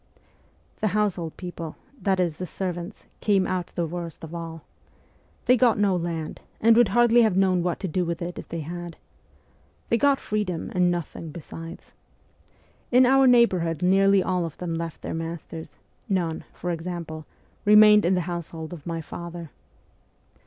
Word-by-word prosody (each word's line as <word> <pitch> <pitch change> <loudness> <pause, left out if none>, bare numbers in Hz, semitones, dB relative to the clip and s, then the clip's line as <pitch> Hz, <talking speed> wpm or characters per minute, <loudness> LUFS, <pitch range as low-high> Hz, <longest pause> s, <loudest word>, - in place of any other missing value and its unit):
The 215 - +1
' 205 +1 0
household 175 -6 -1
people 170 -3 -6
' 275 0 -27
that 190 -2 +1
is, 170 -4 0
the 180 - -5
servants 180 +1 -5
came 195 -3 +2
out 180 -2 -2
the 170 - -3
worst 170 0 -6
of 160 +1 -8
all. 165 -2 -6 0.8
They 250 - +6
got 245 -2 +4
no 200 -2 +3
land, 165 -2 -4 0.2
and 225 +1 +5
would 240 -1 +6
hardly 240 0 +5
have 215 -5 +3
known 185 -2 +3
what 175 0 -1
to 195 - -2
do 180 +2 0
with 170 -1 -3
it 175 0 -5
if - - -10
they 165 - -4
had. 175 +2 -7 0.9
They 230 - +2
got 280 +1 +4
freedom, 205 -6 -2
and 180 -1 +3
nothing 170 -1 -4
besides. 165 +1 -9 1.0
In 255 +1 +6
our 270 +1 +5
neighbourhood 185 - +3
nearly 195 +1 +4
all 180 -1 0
of 165 -2 -6
them 175 -2 -4
left 165 -2 -5
their - - -4
masters; 165 -2 -6 0.3
none, 175 -5 -1
for 175 - -4
example, 165 -2 -5 0.4
remained 210 0 +7
in 180 +2 +3
the 180 - +1
household 170 -1 -5
of 160 -3 -10
my 165 -1 -3
father. 170 -1 -8
175 Hz, 170 wpm, -25 LUFS, 165-200 Hz, 1.0 s, remained